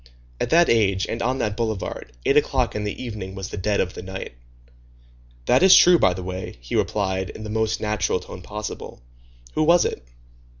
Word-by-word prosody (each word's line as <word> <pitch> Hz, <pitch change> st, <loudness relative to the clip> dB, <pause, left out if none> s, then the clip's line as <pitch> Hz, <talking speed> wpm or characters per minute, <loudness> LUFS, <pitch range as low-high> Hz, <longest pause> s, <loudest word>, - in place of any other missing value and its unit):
At -, -, -1 dB
that 170 Hz, +1 st, +5 dB
age, 100 Hz, -4 st, +2 dB
and 115 Hz, -, -4 dB
on 130 Hz, +2 st, 0 dB
that 105 Hz, -5 st, -1 dB
boulevard, 110 Hz, -3 st, -4 dB
eight 140 Hz, -, +3 dB
o'clock 130 Hz, -4 st, +2 dB
in 105 Hz, 0 st, -2 dB
the 105 Hz, -, -4 dB
evening 105 Hz, -5 st, -6 dB
was 95 Hz, -1 st, -6 dB
the -, -, -6 dB
dead 100 Hz, +2 st, 0 dB
of 90 Hz, -, -1 dB
the -, -, -7 dB
night. 95 Hz, -6 st, -7 dB, 1.1 s
"That -, -, +4 dB
is 190 Hz, 0 st, +8 dB
true, 175 Hz, -1 st, +7 dB
by 90 Hz, -, +3 dB
the 90 Hz, -, -6 dB
way," 95 Hz, +1 st, -6 dB
he -, -, -6 dB
replied, 95 Hz, -2 st, -1 dB
in 110 Hz, -, -9 dB
the 105 Hz, -, -6 dB
most 110 Hz, 0 st, 0 dB
natural 105 Hz, -3 st, 0 dB
tone 90 Hz, -, -10 dB
possible. 105 Hz, -, -7 dB, 0.5 s
"Who -, -, 0 dB
was 170 Hz, +3 st, +5 dB
it?" -, -, -3 dB
105 Hz, 200 wpm, -23 LUFS, 95-115 Hz, 1.1 s, is